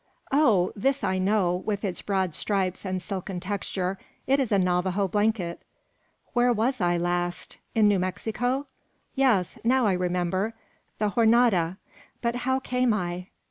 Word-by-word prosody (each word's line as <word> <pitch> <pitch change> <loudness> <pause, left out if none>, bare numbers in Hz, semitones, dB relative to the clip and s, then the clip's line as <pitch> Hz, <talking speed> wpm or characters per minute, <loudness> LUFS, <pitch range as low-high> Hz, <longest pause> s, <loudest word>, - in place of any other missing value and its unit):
Oh! 225 -11 +3
this 270 +7 0
I 190 0 +1
know, 185 -2 +2
with 205 +2 -3
its 185 -3 -3
broad 190 -4 -1
stripes 190 +1 -1
and 185 -1 -1
silken 185 -1 -5
texture; 190 0 -3 0.3
it 275 +2 +3
is 260 -5 0
a 200 - +4
Navajo 185 +1 +1
blanket! 205 -3 0 0.7
Where 245 0 +3
was 240 +2 0
I 175 0 +2
last? 175 0 -2 0.2
In 220 -2 +5
New 205 -2 +3
Mexico? 225 +9 -1 0.5
Yes. 225 - +2
Now 255 +1 +3
I 200 - +3
remember: 180 +4 -1 0.4
the 210 -1 0
Jornada! 220 -6 +3 0.4
but 235 0 -1
how 260 +1 0
came 250 -3 +1
I? 180 -2 -3
200 Hz, 145 wpm, -26 LUFS, 180-235 Hz, 0.7 s, In